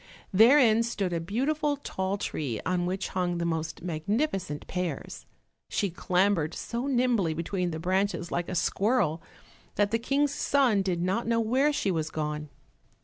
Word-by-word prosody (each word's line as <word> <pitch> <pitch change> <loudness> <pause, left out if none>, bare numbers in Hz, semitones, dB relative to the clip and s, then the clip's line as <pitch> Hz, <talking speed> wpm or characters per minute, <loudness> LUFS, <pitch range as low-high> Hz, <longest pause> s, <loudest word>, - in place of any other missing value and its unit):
Therein 230 +1 +6
stood 200 -6 -2
a 170 - 0
beautiful 285 - 0
tall 190 -7 -3
tree 140 - -3
on 180 -1 0
which 190 +2 -2
hung 180 -2 -1
the 170 - -1
most 160 -1 -3
magnificent 180 - -2
pears. 180 -5 -4 0.4
She 200 -3 0
clambered 180 -2 +1
so 240 +3 -4
nimbly 240 - +2
between 175 +2 -2
the 160 - -4
branches 185 +1 -1
like 175 0 -2
a 185 - -3
squirrel 185 -2 +1 0.5
that 205 0 +2
the 230 - +1
King's 280 +4 +1
son 260 -10 +2
did 180 -3 -1
not 195 +6 0
know 230 0 +2
where 260 +6 +2
she 205 -9 0
was 160 -2 -1
gone. 150 -1 -3
190 Hz, 155 wpm, -28 LUFS, 170-230 Hz, 0.5 s, Therein